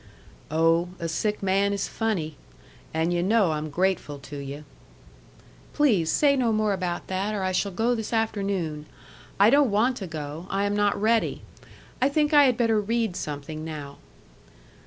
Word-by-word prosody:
"Oh, 165 Hz, +3 st, +2 dB
a 170 Hz, -, -3 dB
sick 210 Hz, +6 st, -2 dB
man 195 Hz, +1 st, +2 dB
is 200 Hz, -, -2 dB
funny. 185 Hz, -9 st, -2 dB, 0.6 s
And 160 Hz, +2 st, 0 dB
yu' 175 Hz, -, +1 dB
know 200 Hz, -1 st, +3 dB
I'm 155 Hz, 0 st, -3 dB
grateful 175 Hz, -2 st, -1 dB
to 145 Hz, +1 st, -9 dB
you." 140 Hz, +1 st, -7 dB, 1.1 s
"Please 215 Hz, -, +2 dB
say 285 Hz, -2 st, +4 dB
no 245 Hz, -4 st, +1 dB
more 215 Hz, -1 st, +1 dB
about 180 Hz, -2 st, -3 dB
that, 195 Hz, +3 st, -2 dB
or 195 Hz, -, -2 dB
I 185 Hz, -, 0 dB
shall 200 Hz, +2 st, 0 dB
go 225 Hz, +6 st, +1 dB
this 220 Hz, -3 st, -4 dB
afternoon. 195 Hz, -9 st, -1 dB, 0.5 s
I 205 Hz, +3 st, +6 dB
don't 285 Hz, -2 st, +5 dB
want 235 Hz, +5 st, +2 dB
to 195 Hz, -, -5 dB
go. 155 Hz, +1 st, -6 dB
I 195 Hz, +1 st, 0 dB
am 205 Hz, 0 st, 0 dB
not 205 Hz, -1 st, +1 dB
ready. 225 Hz, +2 st, +1 dB, 0.6 s
I 265 Hz, -, +4 dB
think 300 Hz, +1 st, +1 dB
I 290 Hz, -1 st, +8 dB
had 250 Hz, -3 st, +2 dB
better 225 Hz, -3 st, +2 dB
read 225 Hz, -2 st, -1 dB
something 150 Hz, 0 st, -5 dB
now." 145 Hz, -3 st, -7 dB
195 Hz, 170 wpm, -25 LUFS, 160-225 Hz, 1.1 s, I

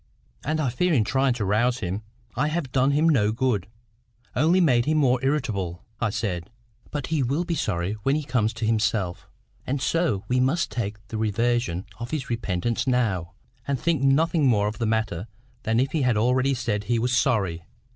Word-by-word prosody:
"And 155 Hz, +2 st, -1 dB
I 145 Hz, -4 st, +1 dB
fear 180 Hz, +8 st, +1 dB
in 120 Hz, -7 st, +4 dB
trying 130 Hz, +4 st, +2 dB
to 115 Hz, -4 st, -2 dB
rouse 120 Hz, +5 st, +2 dB
him, 95 Hz, -2 st, -3 dB, 0.3 s
I 140 Hz, +5 st, +1 dB
have 155 Hz, -4 st, -2 dB
done 130 Hz, +1 st, +3 dB
him 150 Hz, +3 st, +3 dB
no 110 Hz, -10 st, +3 dB
good,—only 120 Hz, -, -2 dB
made 125 Hz, -9 st, +4 dB
him 155 Hz, +1 st, +2 dB
more 130 Hz, -4 st, +2 dB
irritable," 110 Hz, -, -1 dB, 0.2 s
I 120 Hz, -, +1 dB
said. 95 Hz, -5 st, -3 dB, 0.4 s
"But 145 Hz, -3 st, -3 dB
he 155 Hz, -, +2 dB
will 140 Hz, +7 st, 0 dB
be 170 Hz, -, -1 dB
sorry 100 Hz, -, -1 dB
when 135 Hz, +6 st, +2 dB
he 155 Hz, -, -1 dB
comes 120 Hz, -5 st, +1 dB
to 115 Hz, -, -3 dB
himself, 110 Hz, -5 st, 0 dB, 0.4 s
and 135 Hz, +2 st, -1 dB
so 140 Hz, -, 0 dB
we 125 Hz, 0 st, +1 dB
must 135 Hz, +3 st, +1 dB
take 105 Hz, -2 st, -3 dB
the 110 Hz, -, -4 dB
reversion 110 Hz, -3 st, 0 dB
of 120 Hz, 0 st, -5 dB
his 135 Hz, -5 st, -3 dB
repentance 115 Hz, +1 st, -1 dB
now, 100 Hz, -9 st, 0 dB, 0.3 s
and 140 Hz, -2 st, 0 dB
think 165 Hz, 0 st, +1 dB
nothing 145 Hz, +2 st, +3 dB
more 105 Hz, -4 st, +3 dB
of 105 Hz, -, -5 dB
the 115 Hz, -, 0 dB
matter 110 Hz, -4 st, -1 dB, 0.3 s
than 115 Hz, -3 st, +1 dB
if 130 Hz, +2 st, +1 dB
he 160 Hz, -, 0 dB
had 125 Hz, -4 st, +2 dB
already 130 Hz, +4 st, +2 dB
said 110 Hz, -4 st, -2 dB
he 120 Hz, +3 st, +1 dB
was 120 Hz, +1 st, +1 dB
sorry. 100 Hz, -10 st, +1 dB
120 Hz, 190 wpm, -25 LUFS, 105-135 Hz, 0.4 s, in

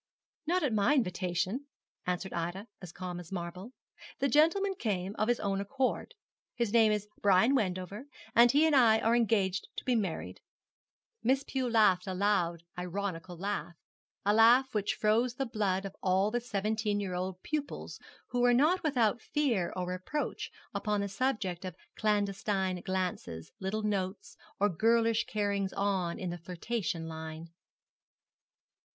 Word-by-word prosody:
'Not 360 Hz, +1 st, +2 dB
at 270 Hz, -6 st, +1 dB
my 215 Hz, +7 st, +3 dB
invitation,' 185 Hz, +3 st, -1 dB, 0.4 s
answered 180 Hz, +1 st, -2 dB
Ida, 175 Hz, +4 st, -3 dB, 0.2 s
as 180 Hz, -3 st, -8 dB
calm 180 Hz, 0 st, -6 dB
as 175 Hz, 0 st, -11 dB
marble 180 Hz, +4 st, -5 dB, 0.5 s
'The 275 Hz, -, +1 dB
gentleman 330 Hz, +9 st, +4 dB
came 200 Hz, -, -2 dB
of 215 Hz, -, +2 dB
his 240 Hz, 0 st, +2 dB
own 195 Hz, -1 st, -1 dB
accord. 260 Hz, +6 st, -2 dB, 0.4 s
His 235 Hz, -3 st, -1 dB
name 225 Hz, -2 st, +6 dB
is 210 Hz, -1 st, -1 dB
Brian 205 Hz, +6 st, +5 dB
Wendover, 200 Hz, +1 st, -2 dB, 0.3 s
and 235 Hz, +1 st, +7 dB
he 295 Hz, +4 st, +5 dB
and 315 Hz, -2 st, +4 dB
I 230 Hz, -4 st, +6 dB
are 225 Hz, +1 st, +2 dB
engaged 200 Hz, -5 st, +1 dB
to -, -, -5 dB
be 255 Hz, -, +2 dB
married.' 195 Hz, -7 st, -3 dB, 0.8 s
Miss 265 Hz, +3 st, +2 dB
Pew 265 Hz, -3 st, -2 dB
laughed 210 Hz, -5 st, +4 dB
a 190 Hz, -, -2 dB
loud 180 Hz, -4 st, +1 dB
ironical 180 Hz, -1 st, -4 dB
laugh, 195 Hz, -2 st, -3 dB, 0.5 s
a 205 Hz, -, +4 dB
laugh 240 Hz, +4 st, +6 dB
which 210 Hz, -1 st, 0 dB
froze 230 Hz, +3 st, +2 dB
the 270 Hz, 0 st, -1 dB
blood 200 Hz, -4 st, -1 dB
of 195 Hz, -, -7 dB
all 190 Hz, +2 st, +2 dB
the 240 Hz, +1 st, 0 dB
seventeen 215 Hz, -1 st, -1 dB
year 195 Hz, -3 st, -3 dB
old 185 Hz, 0 st, -4 dB
pupils 300 Hz, -2 st, -4 dB, 0.3 s
who 245 Hz, -, 0 dB
were 245 Hz, 0 st, +5 dB
not 315 Hz, +8 st, +3 dB
without 240 Hz, -7 st, +1 dB
fear 240 Hz, -12 st, 0 dB
or 180 Hz, -, -2 dB
reproach 185 Hz, +12 st, -3 dB, 0.2 s
upon 210 Hz, -2 st, 0 dB
the 200 Hz, -, -2 dB
subject 195 Hz, -6 st, -1 dB
of 185 Hz, -3 st, -5 dB, 0.2 s
clandestine 200 Hz, -3 st, 0 dB
glances, 180 Hz, -, -3 dB
little 200 Hz, +3 st, -2 dB
notes, 195 Hz, -2 st, -2 dB, 0.2 s
or 205 Hz, -, +4 dB
girlish 230 Hz, +4 st, +2 dB
carryings 200 Hz, -2 st, -1 dB
on 190 Hz, -4 st, 0 dB
in 180 Hz, -2 st, -3 dB
the 175 Hz, -, -6 dB
flirtation 180 Hz, +1 st, -3 dB
line. 160 Hz, 0 st, -7 dB
205 Hz, 155 wpm, -31 LUFS, 185-235 Hz, 0.8 s, and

